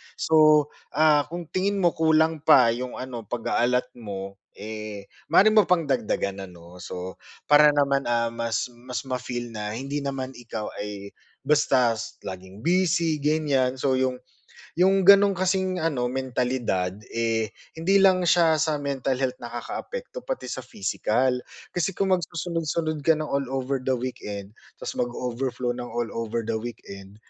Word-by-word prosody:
So, 155 -2 +5 0.3
ah, 150 -2 +4
kung 170 0 -7
tingin 195 +2 0
mo, 175 - +5
kulang 160 0 +2
pa 125 -3 +7
yung 125 +2 -4
ano, 120 -4 -7
pag-a-allot 120 +2 0
mo, 100 -2 -7 0.2
eh, 105 -1 -7 0.2
maaari 215 +3 +6
mo 215 -3 +5
pang 180 -2 +3
dagdagan 100 -7 -1
ano, 90 0 -14
so 90 +1 -7 0.2
para 150 0 +6
naman, 140 -2 +2
ah, 115 -1 +1
mas 115 +1 -2
mas 125 +2 -6
ma-feel 125 -2 -4
na 105 -1 -4
hindi 140 +4 -3
naman 135 -2 -4
ikaw 115 -3 -6
ay 100 -1 -6 0.4
basta 130 -5 +3
s 110 - -7
laging 95 +1 -8
busy 170 -3 +2
ganiyan, 145 -4 +1
so 135 0 +1
yung 130 -1 0 0.6
yung 190 +1 +3
ganun 200 0 +8
kasing 185 0 0
ano, 140 -7 0
mentalidad, 125 -7 -1 0.2
eh, 115 -1 0 0.3
hindi 195 +5 +3
lang 185 -2 +5
siya 165 -2 +4
sa 155 0 +1
mental 135 -2 -1
health 130 0 -2
nakakaapekto, 475 - -6
pati - - -4
sa - - -4
physical. 130 - 0 0.3
Kasi 175 +2 -1
kung 195 - 0
magsusunod-sunod 165 -2 -1
ka 165 - +6
ng 155 -1 -4
all 140 -1 -1
over 135 +1 -1
the 130 +1 0
weekend 105 -5 -6 0.3
ta's - - -3
mag-overflow 125 +1 -2
ng 125 - -5
all 120 0 -3
over 115 0 -2
the 115 0 -2
weekend, 100 -4 -9
130 Hz, 150 wpm, -25 LUFS, 115-160 Hz, 0.6 s, ganun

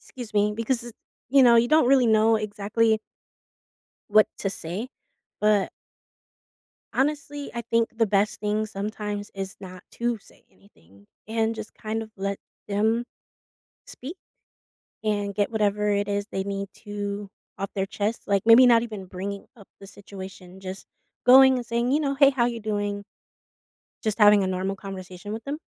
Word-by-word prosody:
Excuse 235 -4 -10
me. 210 +1 +3
Because, 235 0 -2 0.4
you 275 0 +6
know, 235 -1 +7
you 235 +1 +4
don't 310 -4 +5
really 260 -2 +5
know 220 +1 +4
exactly 215 +1 0 1.1
what 215 +1 +6
to 195 - -1
say, 190 +7 -5 0.5
but 210 -2 +3 1.2
honestly, 290 0 -1
I 235 - -3
think 230 0 +1
the 225 - +4
best 210 +1 +1
thing 210 +1 0
sometimes 205 0 -5
is 195 +1 -5
not 185 -2 -10
to 235 -1 -1
say - - -22
anything 100 - -23 0.2
and 225 0 0
just 220 0 -8
kind 220 0 -3
of 220 - -14
let 195 0 -2 0.3
them 220 +4 +1 0.8
speak, 310 +9 -9 0.9
and 205 -2 -1
get 205 +2 0
whatever 210 -1 +1
it 205 0 +1
is 205 0 -1
they 190 - -2
need 200 0 -4
to 205 -2 -5 0.3
off 195 0 -3
their 195 0 0
chest; 210 +3 -3
like, 200 -1 +2
maybe 230 +3 +8
not 235 -2 +6
even 215 -5 -7
bringing 195 +2 -6
up 200 - -15
the 195 - -11
situation, 190 -2 -11
just 190 0 -8 0.4
going 265 +1 +8
and 245 - -4
saying, 235 +2 0
you 295 - +3
know, 280 -2 -1
"Hey, 275 0 +7
how 245 -3 +1
you 235 -1 -2
doing?" 205 -1 -2 1.0
Just 215 -2 -1
having 205 -1 +7
a 190 - 0
normal 190 +1 -2
conversation 190 0 -8
with 225 - -6
them. 285 +2 -4
210 Hz, 160 wpm, -25 LUFS, 200-230 Hz, 1.2 s, maybe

